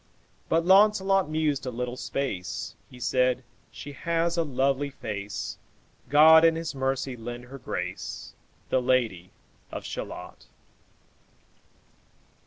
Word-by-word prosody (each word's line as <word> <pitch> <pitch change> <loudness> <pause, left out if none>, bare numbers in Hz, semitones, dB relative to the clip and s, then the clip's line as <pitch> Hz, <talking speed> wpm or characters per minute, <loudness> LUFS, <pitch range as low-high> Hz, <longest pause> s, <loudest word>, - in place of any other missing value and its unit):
But 165 +1 +2
Launcelot 195 -2 +5
mused 155 -4 0
a - - 0
little 125 0 -4
space; 125 -10 -3 0.2
He 125 - -13
said, 125 +1 +1 0.3
'She 145 - -8
has 170 +4 0
a 170 - +2
lovely 140 0 0
face; 105 -5 -5 0.5
God 160 +3 +8
in 165 -1 +5
his 165 -1 -4
mercy 135 -1 -1
lend 120 +1 -7
her 135 +2 -10
grace, - - -5 0.4
The 130 - +2
Lady 115 -9 +1 0.4
of - - -6
Shalott.'" - - -7
135 Hz, 115 wpm, -27 LUFS, 125-160 Hz, 0.5 s, God